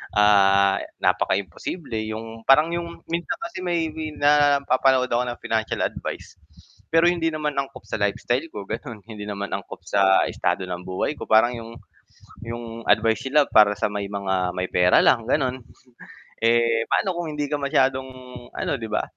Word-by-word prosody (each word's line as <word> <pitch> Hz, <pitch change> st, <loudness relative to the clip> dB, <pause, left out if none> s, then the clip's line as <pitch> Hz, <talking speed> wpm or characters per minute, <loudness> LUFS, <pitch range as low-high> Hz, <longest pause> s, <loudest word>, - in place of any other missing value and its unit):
ah 100 Hz, -1 st, +4 dB, 0.2 s
napaka-imposible, 95 Hz, -, -1 dB, 0.2 s
yung 115 Hz, +1 st, -7 dB
parang 150 Hz, +5 st, +5 dB
yung 170 Hz, -1 st, -6 dB
minsan 170 Hz, +7 st, -2 dB
kasi 340 Hz, -, -6 dB
may 170 Hz, -2 st, 0 dB, 0.3 s
napapanood 140 Hz, -3 st, +3 dB
ako 120 Hz, +1 st, +2 dB
ng 120 Hz, -, -7 dB
financial 110 Hz, -1 st, -1 dB
advice, -, -, -5 dB, 0.6 s
pero 165 Hz, +1 st, +5 dB
hindi 165 Hz, -2 st, 0 dB
naman 150 Hz, -2 st, -2 dB
angkop 140 Hz, -3 st, -4 dB
sa -, -, -2 dB
lifestyle 120 Hz, +7 st, 0 dB
ko 105 Hz, -, -6 dB
gano’n, 115 Hz, -1 st, -6 dB
hindi 105 Hz, -2 st, -8 dB
naman 100 Hz, -1 st, -4 dB
angkop 100 Hz, 0 st, -6 dB
sa 95 Hz, 0 st, +4 dB
estado -, -, -1 dB
ng 90 Hz, 0 st, -5 dB
buhay 95 Hz, +10 st, -2 dB
ko. -, -, -7 dB
Parang 110 Hz, +2 st, +5 dB
yung 115 Hz, 0 st, -9 dB, 0.7 s
yung 115 Hz, 0 st, -7 dB
advice 110 Hz, +3 st, +2 dB
sila 150 Hz, +3 st, +4 dB
para 105 Hz, -1 st, +6 dB
sa 110 Hz, +1 st, 0 dB
may 100 Hz, -1 st, -3 dB
mga 95 Hz, -3 st, -1 dB
may 90 Hz, 0 st, -2 dB
pera 90 Hz, 0 st, +4 dB
lang, 115 Hz, -3 st, +3 dB
gano’n. 130 Hz, -2 st, 0 dB, 0.9 s
Eh, 115 Hz, 0 st, +3 dB
paano 190 Hz, -2 st, +1 dB
kung 170 Hz, -2 st, -3 dB
hindi 145 Hz, 0 st, -2 dB
ka -, -, -1 dB
masyadong 135 Hz, -2 st, +1 dB, 0.5 s
ano -, -, -2 dB
'di 110 Hz, -, -5 dB
ba, 105 Hz, -, 0 dB
115 Hz, 160 wpm, -23 LUFS, 105-145 Hz, 0.9 s, para